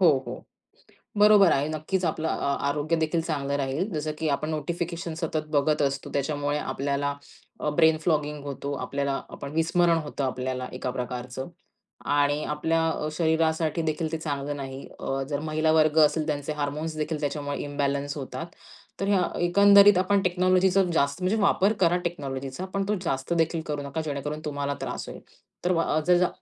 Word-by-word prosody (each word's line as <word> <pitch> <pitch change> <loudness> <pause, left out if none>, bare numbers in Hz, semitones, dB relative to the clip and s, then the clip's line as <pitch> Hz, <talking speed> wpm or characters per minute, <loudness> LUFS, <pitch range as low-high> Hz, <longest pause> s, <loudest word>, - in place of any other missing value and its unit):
हो, 180 - +7 0.2
हो. - - -7 0.7
बरोबर 205 -3 +7
आहे. 145 0 +2
नक्कीच 155 +5 -2
आपलं 160 0 -1
अ 140 - 0
आरोग्य 145 +3 0
देखील 160 +1 0
चांगलं 140 -4 -2
राहील. 140 +8 -1
जसं 155 0 -2
की 160 - -2
आपण 150 +2 -1
नोटिफिकेशन 170 +1 -3
सतत 155 -1 -2
बघत 150 +1 +2
असतो. 140 0 -1
त्याच्यामुळे 145 +1 -1
आपल्याला 140 0 -1 0.5
अ, - - -1
ब्रेन 160 +1 +4
फ्लॉगिंग 150 -3 0
होतो. 140 0 -4
आपल्याला 140 -1 -2
आपण 140 - -7
विस्मरण 165 +1 +3
होतं 145 -1 -4
आपल्याला 130 0 -3
एका 125 0 -3
प्रकारचं. 125 +1 -5 0.6
आणि 145 +1 +2
आपल्या 165 +2 0
अ, 155 - -2
शरीरासाठी 160 0 +1
देखील 160 0 -2
ते 160 - -1
चांगलं 145 -2 -3
नाही. 135 -1 -7
अ, 135 0 -2
जर 145 -1 -1
महिलावर्ग 155 0 +3
असेल 155 +1 -1
त्यांचे 145 0 -2
हार्मोन्स 150 +2 -2
देखील 155 0 -2
त्याच्यामुळे 145 0 -2
इम्बॅलन्स 145 0 -2
होतात. 140 +4 -5 0.5
तर 195 - -1
हं, 190 -3 +1
एकंदरीत 200 +2 +7
आपण 195 +2 +2
टेक्नॉलॉजीचा 185 +1 +3
जास्त, 140 +3 +1
म्हणजे 185 +4 +1
वापर 200 +1 +3
करा 175 -1 +4
टेक्नॉलॉजीचा, 140 -1 -4
पण 195 - 0
तो 210 - +1
जास्त 135 -1 -1
देखील 165 0 +1
करू 150 -1 -3
नका 140 +3 -4
जेणेकरून 150 +1 -3
तुम्हाला 145 -1 -2
त्रास - - -4
होईल. - - -9 0.4
तर 180 - +3
व 170 - +2
अ 155 - +1
ज - - +4
जा 180 - +4
155 Hz, 170 wpm, -26 LUFS, 140-165 Hz, 0.7 s, हो